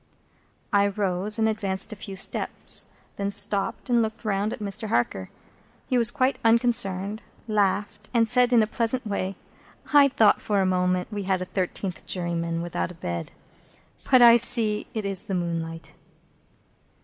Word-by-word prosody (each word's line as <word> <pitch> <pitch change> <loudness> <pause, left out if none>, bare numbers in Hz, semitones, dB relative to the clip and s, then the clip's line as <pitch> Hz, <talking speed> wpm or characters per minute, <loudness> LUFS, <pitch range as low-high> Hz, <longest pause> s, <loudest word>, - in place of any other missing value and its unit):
I 200 0 +4
rose, 200 +1 +1
and 220 0 +2
advanced 210 -1 -1
a - - -8
few 200 -1 -8
steps; 190 - -1 0.3
then 200 0 -2
stopped, 205 +2 -2
and 240 -2 +2
looked 220 0 -4
round 205 0 -1
at 245 - -5
Mr. 210 0 -2
Harker. 110 - -1 0.6
He 255 - -2
was 235 -2 +5
quite 255 +2 0
unconcerned, 220 -3 +1 0.3
laughed, 210 0 -1
and 230 -2 +2
said 250 +2 +5
in 235 -3 +5
a - - +1
pleasant 230 +3 -2
way, 195 -2 -3 0.6
"I 285 -1 +7
thought 240 -6 +3
for 205 -2 0
a 190 - +2
moment 180 +1 0
we 205 -2 -4
had 190 -1 +1
a 185 - -4
thirteenth 185 0 -4
juryman, 170 -2 -2
without 175 -1 -3
a 180 - -11
bed. 85 - -5 0.8
But 255 -2 +6
I 235 0 +8
see 225 -3 +3
it 215 -2 -3
is 195 -2 -1
the 195 - -3
moonlight." 165 -2 -4
205 Hz, 160 wpm, -24 LUFS, 185-225 Hz, 0.8 s, I